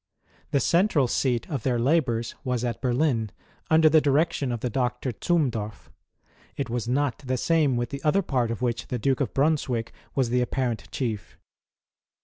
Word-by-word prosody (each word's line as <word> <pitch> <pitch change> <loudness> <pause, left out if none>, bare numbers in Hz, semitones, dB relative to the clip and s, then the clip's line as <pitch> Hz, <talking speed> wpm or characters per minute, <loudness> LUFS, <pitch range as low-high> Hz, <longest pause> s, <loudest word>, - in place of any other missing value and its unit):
Tlie 140 - +2
central 170 -7 +3
seat 120 -1 0
of 140 -6 -3
their 125 +1 0
labours 120 -3 +1
was 125 -2 -1
at 120 -2 -3
Berlin, 125 -3 +1 0.4
under 160 0 +6
the 155 0 +5
direction 145 -2 +1
of 120 -2 -3
the 125 - -1
Doctor 125 +1 -1
Zumdorf. 115 -7 -1 0.7
It 135 -5 -3
was 120 -1 -2
not 135 0 0
the 130 -2 -2
same 150 -2 +2
with 120 0 -2
the 140 0 -5
other 195 +6 +3
part 125 -7 0
of 115 +1 -4
which 120 -1 -1
the 125 - -2
Duke 135 +4 0
of 135 - 0
Brunswick 135 -5 0 0.2
was 130 -4 +1
the 125 0 +3
aj)parcnt 120 -2 -2
Chief. 110 -8 -4
125 Hz, 170 wpm, -26 LUFS, 120-145 Hz, 0.7 s, under